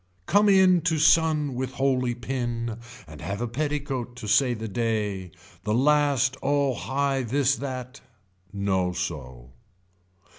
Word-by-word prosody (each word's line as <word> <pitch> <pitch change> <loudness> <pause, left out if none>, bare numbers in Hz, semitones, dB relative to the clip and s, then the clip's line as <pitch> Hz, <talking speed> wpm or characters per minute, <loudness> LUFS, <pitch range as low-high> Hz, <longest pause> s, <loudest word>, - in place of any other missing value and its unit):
Come 205 - +4
in 190 -3 +5
to 165 -2 +2
sun 155 -2 +3
with 130 +1 -4
holy 130 -3 0
pin 120 -2 -3 0.3
and 75 -2 -12
have 100 +5 -4
the 120 - -2
petticoat 135 -2 -3
to 125 -4 -8
say 125 +3 +3
the 110 0 -5
day, 105 -4 -2 0.3
the 105 0 0
last 140 -1 +3
oh 140 -1 +1
high 135 +2 -1
this 135 +2 +1
that. 130 -1 -6 0.5
No 95 -3 0
so. 65 -9 -6
125 Hz, 135 wpm, -25 LUFS, 110-140 Hz, 0.5 s, in